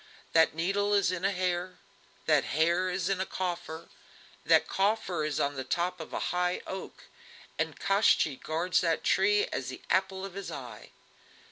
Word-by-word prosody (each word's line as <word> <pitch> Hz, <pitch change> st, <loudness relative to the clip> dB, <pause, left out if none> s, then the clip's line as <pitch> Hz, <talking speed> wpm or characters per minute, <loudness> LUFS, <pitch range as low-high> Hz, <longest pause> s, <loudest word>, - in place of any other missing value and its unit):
That 160 Hz, -1 st, +4 dB
needle 200 Hz, +5 st, +1 dB
is 195 Hz, -3 st, +3 dB
in 185 Hz, 0 st, -4 dB
a 195 Hz, -, +3 dB
hare, 180 Hz, -1 st, -2 dB, 0.5 s
that -, -, +4 dB
hare 170 Hz, +5 st, +1 dB
is 180 Hz, -1 st, -1 dB
in 195 Hz, -1 st, 0 dB
a -, -, 0 dB
coffer, 175 Hz, -3 st, -4 dB, 0.6 s
that -, -, +4 dB
coffer 195 Hz, -4 st, 0 dB
is 150 Hz, -2 st, -1 dB
on 140 Hz, 0 st, +1 dB
the 135 Hz, -1 st, -4 dB
top 175 Hz, +6 st, -1 dB
of 160 Hz, -, -8 dB
a -, -, -3 dB
high 180 Hz, 0 st, 0 dB
oak, 190 Hz, 0 st, -7 dB, 0.6 s
and -, -, -2 dB
Koshchei 195 Hz, -8 st, +3 dB
guards 170 Hz, +3 st, 0 dB
that 165 Hz, -2 st, 0 dB
tree 205 Hz, +2 st, +3 dB
as 130 Hz, -, -3 dB
the 130 Hz, -, -8 dB
apple 190 Hz, 0 st, +1 dB
of 195 Hz, -, -8 dB
his 200 Hz, 0 st, -6 dB
eye." 120 Hz, -6 st, -8 dB
180 Hz, 170 wpm, -29 LUFS, 160-190 Hz, 0.6 s, That